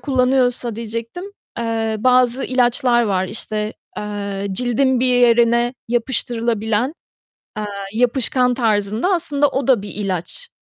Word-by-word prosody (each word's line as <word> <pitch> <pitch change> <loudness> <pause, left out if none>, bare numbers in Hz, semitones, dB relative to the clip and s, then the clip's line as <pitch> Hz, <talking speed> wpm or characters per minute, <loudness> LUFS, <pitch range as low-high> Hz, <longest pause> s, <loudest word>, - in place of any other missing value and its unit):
kullanıyorsa 250 -4 +1
diyecektim, 230 - -5 0.3
eee, 225 -1 -1
bazı 250 +1 +3
ilaçlar 245 -1 +2
var 190 -4 0
işte, 215 -1 -1 0.3
eee, 200 -1 -4
cildin 250 +4 +1
bir 255 - +2
yerine 240 0 +3
yapıştırılabilen, 235 0 -1 0.6
eee, 215 - -3 0.3
yapışkan 250 +2 +2
tarzında, 220 - 0
aslında 295 -4 +1
o 270 -2 -2
da 250 -7 +3
bir 205 - -7
ilaç. 200 - -3
240 Hz, 115 wpm, -19 LUFS, 220-255 Hz, 0.6 s, bazı